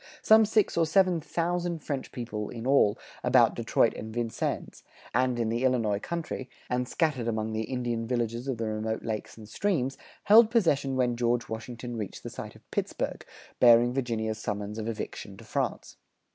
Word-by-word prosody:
Some 220 Hz, 0 st, +7 dB
six 215 Hz, -3 st, +2 dB
or 165 Hz, -1 st, +3 dB
seven 180 Hz, 0 st, +3 dB
thousand 170 Hz, 0 st, -2 dB
French 140 Hz, -3 st, -4 dB
people 110 Hz, -4 st, -5 dB
in 115 Hz, -1 st, -7 dB
all, 130 Hz, -6 st, +4 dB, 0.3 s
about -, -, +5 dB
Detroit -, -, +2 dB
and 110 Hz, +1 st, -7 dB
Vincennes, 115 Hz, 0 st, -3 dB, 0.3 s
and 125 Hz, 0 st, +2 dB
in 115 Hz, -2 st, 0 dB
the 120 Hz, +3 st, -1 dB
Illinois 115 Hz, -6 st, +2 dB
country, 160 Hz, -3 st, -5 dB, 0.2 s
and 125 Hz, 0 st, 0 dB
scattered 145 Hz, -8 st, 0 dB
among 110 Hz, -1 st, -1 dB
the 110 Hz, 0 st, -1 dB
Indian 120 Hz, -3 st, -2 dB
villages 120 Hz, 0 st, -2 dB
of 130 Hz, -3 st, -1 dB
the 115 Hz, -, -2 dB
remote 110 Hz, +1 st, -2 dB
lakes 110 Hz, -1 st, -4 dB
and 110 Hz, -2 st, -11 dB
streams, 135 Hz, -, -1 dB, 0.2 s
held 220 Hz, +2 st, +7 dB
possession 145 Hz, -, +2 dB
when 125 Hz, -2 st, +1 dB
George 120 Hz, 0 st, +1 dB
Washington 120 Hz, +2 st, -6 dB
reached 105 Hz, -3 st, -6 dB
the -, -, -6 dB
site -, -, -8 dB
of -, -, -20 dB
Pittsburgh, -, -, -2 dB, 0.4 s
bearing 120 Hz, 0 st, +6 dB
Virginia's 110 Hz, -4 st, -2 dB
summons 105 Hz, 0 st, -4 dB
of 110 Hz, -, -4 dB
eviction 105 Hz, -3 st, -5 dB
to -, -, -12 dB
France. -, -, -3 dB
120 Hz, 170 wpm, -28 LUFS, 110-140 Hz, 0.4 s, Some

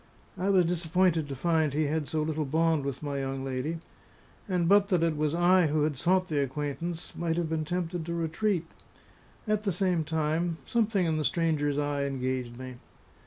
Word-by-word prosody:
I 190 Hz, +2 st, -1 dB
was 185 Hz, -3 st, +5 dB
disappointed 170 Hz, -2 st, +1 dB
to 135 Hz, -, -4 dB
find 160 Hz, 0 st, +1 dB
he 155 Hz, +2 st, +1 dB
had 150 Hz, 0 st, -1 dB
so 155 Hz, -1 st, -1 dB
little 155 Hz, 0 st, -1 dB
bond 160 Hz, +1 st, +1 dB
with 140 Hz, +1 st, -4 dB
my 140 Hz, -1 st, -2 dB
young 135 Hz, 0 st, -3 dB
lady; 135 Hz, +5 st, -2 dB, 0.7 s
and 180 Hz, -2 st, +1 dB
but 200 Hz, +2 st, +5 dB
that 180 Hz, -5 st, +2 dB
it 165 Hz, -2 st, +1 dB
was 150 Hz, +1 st, 0 dB
I 175 Hz, 0 st, +4 dB
who 150 Hz, 0 st, +1 dB
had 150 Hz, -1 st, 0 dB
sought 185 Hz, +7 st, +2 dB
the 150 Hz, -4 st, 0 dB
acquaintance, 150 Hz, +5 st, -4 dB
might 170 Hz, -1 st, -1 dB
have 170 Hz, -2 st, -1 dB
been 160 Hz, -1 st, -1 dB
tempted 175 Hz, 0 st, -2 dB
to 170 Hz, -, -2 dB
retreat. 170 Hz, +2 st, 0 dB, 0.8 s
At 210 Hz, -1 st, +1 dB
the 205 Hz, -2 st, 0 dB
same 180 Hz, -2 st, +1 dB
time, 160 Hz, +2 st, -1 dB
something 215 Hz, -5 st, +1 dB
in 160 Hz, -1 st, +1 dB
the 155 Hz, -, 0 dB
stranger's 150 Hz, -3 st, +1 dB
eye 145 Hz, -1 st, 0 dB
engaged 130 Hz, -3 st, -3 dB
me. 130 Hz, -1 st, -8 dB
160 Hz, 190 wpm, -29 LUFS, 145-175 Hz, 0.8 s, was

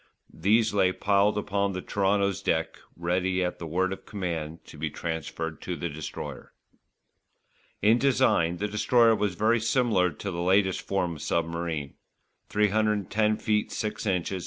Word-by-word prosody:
These 110 Hz, +2 st, +2 dB
lay 95 Hz, -2 st, +3 dB
piled 100 Hz, +2 st, +2 dB
upon 100 Hz, -1 st, 0 dB
the 90 Hz, -, -4 dB
Toronto's 100 Hz, -1 st, +1 dB
deck -, -, -1 dB, 0.2 s
ready 90 Hz, +2 st, 0 dB
at 90 Hz, -, -3 dB
the 85 Hz, -, -5 dB
word 95 Hz, +4 st, 0 dB
of -, -, -10 dB
command 85 Hz, -5 st, -4 dB
to -, -, -13 dB
be 80 Hz, +1 st, -1 dB
transferred 80 Hz, 0 st, -4 dB
to 90 Hz, -, -4 dB
the 85 Hz, -, -3 dB
Destroyer. 75 Hz, 0 st, -7 dB, 1.3 s
In 110 Hz, +3 st, +5 dB
design 125 Hz, -11 st, +2 dB
the 105 Hz, +4 st, -1 dB
Destroyer 115 Hz, +3 st, +4 dB
was 105 Hz, -4 st, -1 dB
very 110 Hz, +4 st, +2 dB
similar 110 Hz, -5 st, +2 dB
to 95 Hz, +5 st, -6 dB
the 85 Hz, -1 st, -3 dB
latest 95 Hz, +1 st, +2 dB
form 90 Hz, -4 st, -2 dB
of -, -, -11 dB
submarine: 85 Hz, -3 st, -2 dB, 0.6 s
310 105 Hz, 0 st, +1 dB
ft. 105 Hz, -1 st, 0 dB
6 110 Hz, +1 st, -3 dB
ins. 90 Hz, -1 st, 0 dB
95 Hz, 150 wpm, -27 LUFS, 85-105 Hz, 1.3 s, In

